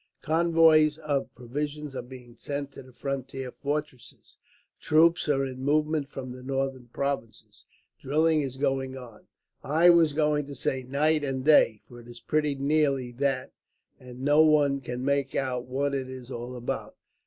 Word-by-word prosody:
"Convoys 160 -2 +4
of 150 -3 -2
provisions 145 +3 -5
are 125 - -3
being 125 -1 -13
sent 140 +3 -5
to - - -11
the 130 0 -16
frontier 135 0 -5
fortresses. 145 -3 -6 0.4
Troops 165 +1 +3
are 135 -2 +2
in 130 -1 -7
movement 150 0 +1
from 130 -3 -7
the 125 0 -9
Northern 135 -1 -3
Provinces. 130 -3 -5 0.3
Drilling 155 +3 +2
is 135 -2 -5
going 135 -1 -1
on 120 -4 -12 0.4
I 160 +6 +5
was 165 -3 +4
going 150 -1 +1
to 140 - -8
say 130 -1 -2
night 145 +4 +1
and 135 -1 -3
day, 115 -8 +5
for 120 - -14
it 120 - -14
is 120 0 -11
pretty 150 +2 0
nearly 140 -3 +1
that 130 +1 -1 0.5
and 125 0 -11
no 145 +3 +4
one 145 -3 +3
can 125 0 -5
make 140 -1 0
out 125 -2 -2
what 140 +2 -1
it 130 -2 -3
is 130 -1 -9
all 120 +1 -6
about. 120 -1 -5
140 Hz, 165 wpm, -27 LUFS, 130-150 Hz, 0.5 s, I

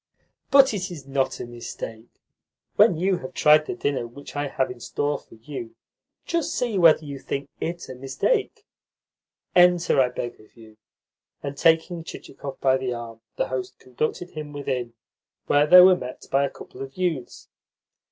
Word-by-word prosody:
"But 270 -3 +6
it 185 -3 -3
is 155 -6 -9
not 135 -1 -1
a - - -4
mistake. 120 -1 -8 0.7
When 205 -5 +5
you 185 +2 +1
have 130 - -9
tried 150 0 +5
the - - -3
dinner 140 -8 -2
which 140 +4 -12
I 145 0 -1
have 130 -2 -1
in 125 - -10
store 145 +4 -2
for - - -18
you, 115 0 -8 0.5
just 335 -1 -1
see 235 -6 0
whether 160 -2 +6
you 140 -1 -6
think 140 +1 -5
IT 170 +1 -4
a - - -7
mistake. 270 - -1 0.9
Enter, 175 -5 +5
I 125 - +2
beg 120 -1 -6
of 110 +2 -21
you." 110 -1 -16 0.7
And, 140 0 -4
taking 165 +2 +2
Chichikov 140 -4 -9
by 130 -1 +3
the 130 -2 -3
arm, 115 -1 -8
the - - -1
host 130 -1 -4
conducted 155 +7 -4
him 150 -1 -7
within, 130 -4 -3 0.5
where 145 +1 +3
they 180 +3 +10
were 185 0 +8
met 125 -7 -8
by 140 +1 +3
a - - -2
couple 130 - -12
of 135 +3 -8
youths. 170 -9 -3
140 Hz, 170 wpm, -24 LUFS, 130-175 Hz, 0.9 s, they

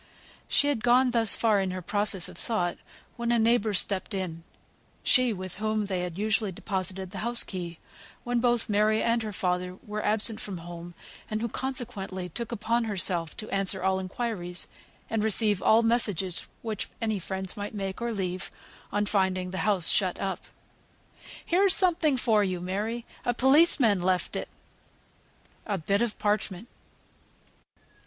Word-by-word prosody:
She 285 - +3
had 230 -7 -1
gone 250 +1 +5
thus 225 -3 +2
far 220 -3 +3
in 190 - -1
her 185 0 -4
process 205 -2 +1
of - - -11
thought, 180 -7 -2 0.4
when 235 0 -1
a 240 - +4
neighbour 225 -1 +3
stepped 195 +1 0
in; 170 -4 -4 0.6
she 255 -2 +4
with 185 -3 -5
whom 215 0 0
they 190 -2 -2
had 180 -1 -4
usually 215 0 +1
deposited 190 0 -3
the 200 - -6
house 235 +2 +4
key, 175 -3 -6 0.5
when 245 0 0
both 240 -1 +2
Mary 215 +1 +2
and 230 0 +2
her 215 -1 -4
father 180 -1 -1
were 210 0 -4
absent 215 +1 +1
from 195 -3 -6
home, 170 0 -9 0.3
and 215 - -1
who 235 - -1
consequently 215 -8 -4
took 235 +7 -5
upon 235 +1 0
herself 180 -5 -1
to 215 - -6
answer 195 -1 0
all 190 0 +2
inquiries, 185 -2 -3 0.4
and 220 -1 -1
receive 210 -2 +3
all 225 +1 +5
messages 205 -6 +1 0.2
which 220 -3 -3
any 220 -3 -1
friends 190 +1 -3
might 205 +1 -5
make, 195 +1 -4
or 235 0 -1
leave, 185 -3 -3 0.4
on 205 +1 +1
finding 190 -3 0
the 190 - -3
house 185 -5 +4
shut 185 -3 +2
up. 190 -2 -2 1.1
"Here's 380 +2 +3
somewhat 325 -7 +2
for 220 -4 +3
you, 185 -2 -1
Mary! 210 +6 -3 0.2
A 245 - 0
policeman 265 - +5
left 185 0 0
it." - - -3 1.2
A 205 -2 0
bit 195 +5 0
of 235 -3 -1
parchment. 210 0 -1
205 Hz, 160 wpm, -28 LUFS, 185-230 Hz, 1.2 s, gone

